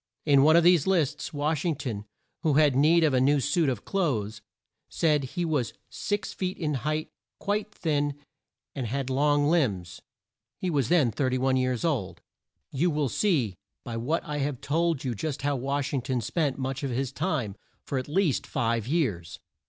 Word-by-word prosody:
In 140 -3 +5
one 155 +3 +6
of 170 - +6
these 175 -3 +5
lists 155 -6 0
Wash 150 0 -1
ing 170 -4 +1
ton, 115 -7 -5 0.4
who 155 -4 +2
had 145 -3 +4
need 160 +5 +5
of 150 -3 +3
a 130 - +3
new 140 +2 +4
suit 150 +2 +1
of 120 -5 -4
clothes, 110 - -1 0.5
said 150 -3 +2
he 175 +7 -3
was 145 -7 -1 0.2
six 205 -1 -3
feet 185 0 -3
in 155 -4 -1
height, 155 +4 -2 0.3
quite 210 +1 -1
thin, 145 -5 -1 0.6
and 130 -4 -3
had 135 +2 -2
long 145 +2 +3
limbs. 105 - 0 0.6
He 185 - -2
was 140 -7 +1
then 150 -9 +4
31 130 +1 +1
years 130 0 0
old. 135 - -1 0.5
You 160 +6 +1
will 150 -4 0
see 135 - +1 0.3
by 120 - -5
what 130 +9 -1
I 150 -2 -3
have 140 -2 -2
told 165 0 0
you 130 -3 -1
just 140 +5 -4
how 145 0 +1
Wash 140 +2 -2
ing 135 - +1
ton 125 0 -1
spent 140 - -1
much 135 0 -3
of 140 - -2
his 130 +1 -2
time 135 - -2 0.3
for 135 - -1
at 130 - -6
least 160 -1 +1
five 115 -3 -1
years. 110 - -1
145 Hz, 185 wpm, -27 LUFS, 130-160 Hz, 0.6 s, one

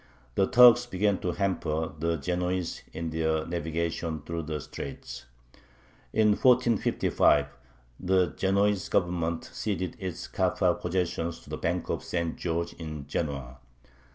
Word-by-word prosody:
The 95 - +2
Turks 125 0 +7
began 100 -2 +1
to 90 - -2
hamper 80 -5 -1
the 85 +1 0
Genoese 90 +3 -2
in 80 0 -4
their 80 0 0
navigation 85 -1 -3
through 85 0 -3
the 75 -1 -2
straits. 65 -3 -8 0.9
In 110 -1 +4
1455 120 +1 +3 0.5
the 95 -1 +2
Genoese 100 0 +1
Government 85 -3 0
ceded 95 -5 -2
its 95 -3 -5
Kaffa - - +1
possessions 85 -2 -1
to - - -14
the - - -3
Bank - - -1
of - - -2
St. 85 -2 -2
George 85 0 -2
in 75 -4 -7
Genoa. 70 -4 -3
85 Hz, 125 wpm, -28 LUFS, 80-95 Hz, 0.9 s, Turks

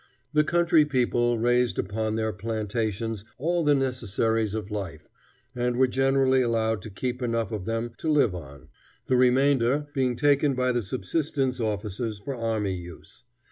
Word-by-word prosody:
The 150 0 +4
country 170 -1 +4
people 120 -4 +1
raised 120 +1 +2
upon 110 +2 -2
their 110 -1 -1
plantations 110 0 -3
all 170 +5 0
the 145 -1 +4
necessaries 115 -4 0
of 105 -1 -5
life, 95 -7 -5 0.5
and 125 -1 -1
were 130 +2 +4
generally 135 0 +2
allowed 110 -3 0
to 110 - -8
keep 125 +5 -4
enough 115 -3 -1
of 105 -4 -4
them 115 +1 -2
to 160 - -2
live 145 -10 +3
on, 70 -6 -10 0.4
the 130 - +1
remainder 130 +2 +3
being 130 -3 +1
taken 145 +1 +3
by 125 0 +1
the 120 -1 0
subsistence 130 - -2
officers 105 0 -3
for 100 +7 -5
army 110 -4 -1
use. 85 +3 -10
120 Hz, 155 wpm, -26 LUFS, 110-130 Hz, 0.5 s, The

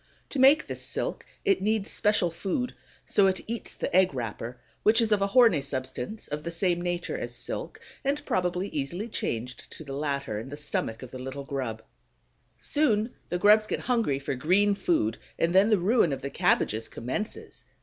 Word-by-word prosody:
To 280 - -2
make 275 +4 +6
this - - -4
silk, - - -3 0.2
it 395 -2 +3
needs 215 0 0
special 210 -5 +2
food; 205 +9 -2 0.3
so 200 -1 +4
it 190 -1 0
eats 230 -2 -5
the - - -3
egg 185 -6 +4
wrapper, 120 0 -4 0.2
which 220 +2 +4
is 225 -2 +2
of 205 -1 +3
a 200 - +3
horny 225 - +5
substance 130 - -4
of 150 +1 -4
the 170 - -4
same 175 +1 +1
nature 175 0 -2
as - - -4
silk, - - -5 0.2
and 285 +2 -1
probably 180 +1 0
easily 165 +9 -3
changed 125 - -4
to - - -8
the 140 -2 -7
latter 140 -6 -2
in 115 +5 -7
the 145 - -7
stomach 115 -5 -3
of 125 - -9
the 130 - -7
little 135 +2 -6
grub. 125 -6 -4 0.7
Soon 235 -6 +1 0.2
the 175 - 0
grubs 210 +3 +5
get - - -2
hungry 230 - +1
for 140 0 -3
green 185 +10 +3
food, 170 - 0 0.2
and 170 +1 +1
then 195 +3 +6
the 215 - +5
ruin 190 -2 +3
of 135 - -4
the 140 - -3
cabbages 115 - +1
commences. 215 - -5
180 Hz, 190 wpm, -28 LUFS, 135-215 Hz, 0.7 s, make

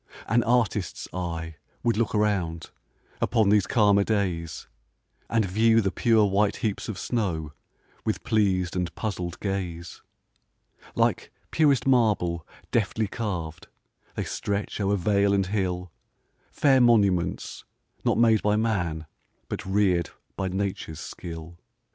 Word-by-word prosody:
An 120 +2 +3
artist's 115 -6 0
eye 80 -3 -4 0.3
would 120 -1 +2
look 115 0 0
around, 95 -6 0 0.5
Upon 110 -4 +2
these 100 -2 +4
calmer 100 -3 +4
days, 90 -7 -2 0.6
And 115 -2 +2
view 110 +4 +3
the 95 -3 +1
pure 115 -4 +3
white 100 +1 +2
heaps 105 -1 -3
of 105 - -4
snow, 85 -12 -2 0.5
With - - -2
pleas'd 95 -5 +1
and 90 -1 -1
puzzl'd 90 -5 -4
gaze. 90 -4 -4 0.9
Like - - +1 0.2
purest 145 -5 +3
marble, 105 -10 +2 0.2
deftly 110 -1 0
carv'd, 90 -8 -4 0.5
They - - -2
stretch 100 +1 -3
o'er 100 +1 +2
vale 100 +1 +2
and 95 -1 +1
hill, 90 -3 -2 0.6
Fair 135 -3 +3
monuments, 100 -7 +2 0.4
not - - +2
made 115 -2 +4
by 105 0 +2
man, 90 -8 -1 0.4
But - - -4
rear'd 95 -4 +2 0.3
by 95 - -2
nature's 95 -4 -3
skill. 85 0 -8
100 Hz, 125 wpm, -26 LUFS, 90-110 Hz, 0.9 s, these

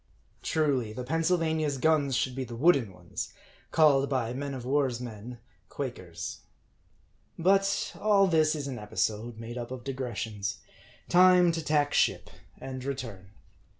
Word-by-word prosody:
Truly, 135 -8 0
the 125 - -5
Pennsylvania's 160 -1 0
guns 145 -2 +2
should 130 +1 0
be 130 +1 -3
the 120 -2 -7
wooden 135 - +3
ones, 90 -2 -7 0.4
called 140 -4 +4
by 125 -4 -1
men 140 +1 -4
of 125 -2 -7
war's 135 -3 +1
men, 120 0 -8 0.3
Quakers. 95 -11 -6 1.0
But 195 +3 +2
all 205 -2 +5
this 155 -3 +3
is 145 -2 -4
an 130 -4 -5
episode, 105 +3 -2
made 115 +2 -6
up 120 - -5
of 130 -1 -7
digressions. 115 -6 -4 0.5
Time 180 -1 +6
to 165 -1 -3
tack 150 -1 +1
ship, - - +1 0.3
and 130 -1 -6
return. 115 -9 -5
135 Hz, 140 wpm, -29 LUFS, 120-155 Hz, 1.0 s, Time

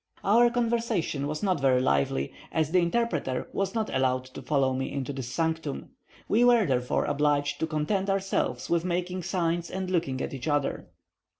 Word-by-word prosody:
Our 235 +4 +5
conversation 230 - 0
was 150 +4 -4
not 185 -5 +1
very 130 -2 +3
lively, 70 - +1 0.2
as 160 -1 0
the 180 - +4
interpreter 170 - 0
was 195 +2 -1
not 220 -1 -1
allowed 130 -1 +1
to - - -7
follow 135 0 +1
me 130 +1 -2
into 140 0 -3
this 130 -2 -5
sanctum. 160 -1 -2 0.4
We 230 +4 +3
were 240 -3 +5
therefore 125 -2 0
obliged 145 -1 +1
to 160 - 0
content 170 +6 -1
ourselves 195 -10 -1
with 170 -1 +1
making 180 +1 -2
signs 170 -1 -1
and 190 -1 -4
looking 165 -7 0
at - - -3
one 135 - -6
another. 145 -2 -1
160 Hz, 175 wpm, -27 LUFS, 135-190 Hz, 0.4 s, Our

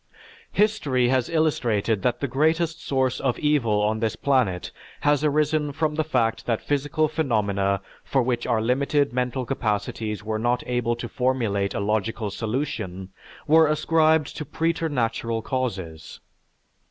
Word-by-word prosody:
History 150 - +2
has 130 -2 +1
illustrated 120 - +1
that 120 +2 0
the 140 - 0
greatest 160 +5 +1
source 130 -2 0
of 130 -3 0
evil 125 -9 +2
on 110 +1 +1
this 110 -1 -1
planet 125 -11 0 0.3
has 145 0 +2
arisen 150 0 +1
from 155 +1 -1
the 155 +1 0
fact 115 -6 0
that 115 -2 +1
physical 145 +2 0
phenomena 100 - 0 0.2
for 135 -2 +1
which 120 -1 -1
our 115 -3 +1
limited 140 +3 +1
mental 125 0 -1
capacities 105 -3 -2
were 110 0 -2
not 120 +2 0
able 120 -1 0
to 120 0 -6
formulate 115 -6 0
a - - -1
logical 105 +1 -1
solution, 105 -5 -3 0.4
were 160 +1 +6
ascribed 155 0 +2
to 150 - -3
preternatural 125 -8 -1
causes. 95 - -4
125 Hz, 140 wpm, -24 LUFS, 110-150 Hz, 0.4 s, were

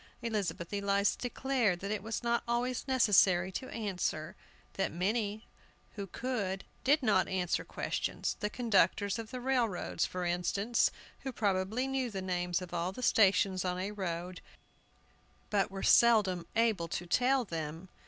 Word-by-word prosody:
Elizabeth 195 -6 -2
Eliza 200 0 +2
declared 245 -6 0
that 200 +2 -4
it 210 -2 -2
was 225 +3 -4
not 235 0 +1
always 245 +3 -1
necessary 195 -7 +4
to 260 - -5
answer; 180 -7 -3 0.4
that 195 - -1
many 205 +4 -1 0.5
who 200 -2 -6
could 200 -4 -3 0.2
did 290 +2 +3
not 205 -5 +3
answer 180 -2 -1
questions, - - -2
the 210 - -1
conductors 205 -3 +2
of 225 -1 -6
the 255 0 -5
railroads, 245 -7 0
for 180 -1 -4
instance, 195 +7 +1 0.3
who 265 - -5
probably 205 +3 0
knew 265 -2 -1
the 195 -3 -4
names 180 -1 -1
of 175 - -10
all 175 +1 -1
the 250 +6 -8
stations 190 -4 +4
on 180 -1 -1
a 190 +3 -3
road, 180 -2 -4 1.1
but 200 -2 +2
were 195 0 -6
seldom 200 -7 +4
able 220 -7 +2
to 175 - -4
tell 255 +7 +2
them. 165 0 -5
200 Hz, 150 wpm, -32 LUFS, 180-235 Hz, 1.1 s, necessary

